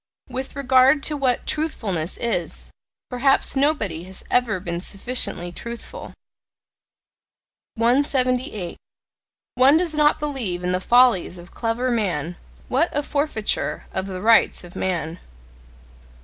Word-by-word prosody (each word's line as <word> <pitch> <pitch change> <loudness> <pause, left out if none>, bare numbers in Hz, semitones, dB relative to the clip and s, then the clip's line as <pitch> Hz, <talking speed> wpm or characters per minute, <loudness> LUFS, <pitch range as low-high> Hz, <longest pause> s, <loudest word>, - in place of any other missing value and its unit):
With 260 +1 -5
regard 270 +1 +4
to 305 - +1
what 265 -4 0
"truthfulness" 200 - -2
is, 220 -8 -3 0.4
perhaps 270 +3 +2
nobody 225 - 0
has 190 0 -11
ever 235 -6 +2
been 170 -1 -4
sufficiently 195 -3 -2
truthful. 235 - -8 1.6
178. 250 - 0 0.8
One 265 +4 +5
does 340 -2 0
not 300 0 +3
believe 250 -12 -3
in 180 - 0
the 180 0 0
follies 240 -6 +4
of 175 +1 -13
clever 240 +2 -1
men: 180 -8 -1 0.3
what 280 +7 +1
a 290 - 0
forfeiture 285 -7 -2
of 190 +1 -2
the 185 -1 -6
rights 230 -3 +4
of 175 0 -13
man! 175 -2 -2
235 Hz, 120 wpm, -22 LUFS, 185-270 Hz, 1.6 s, One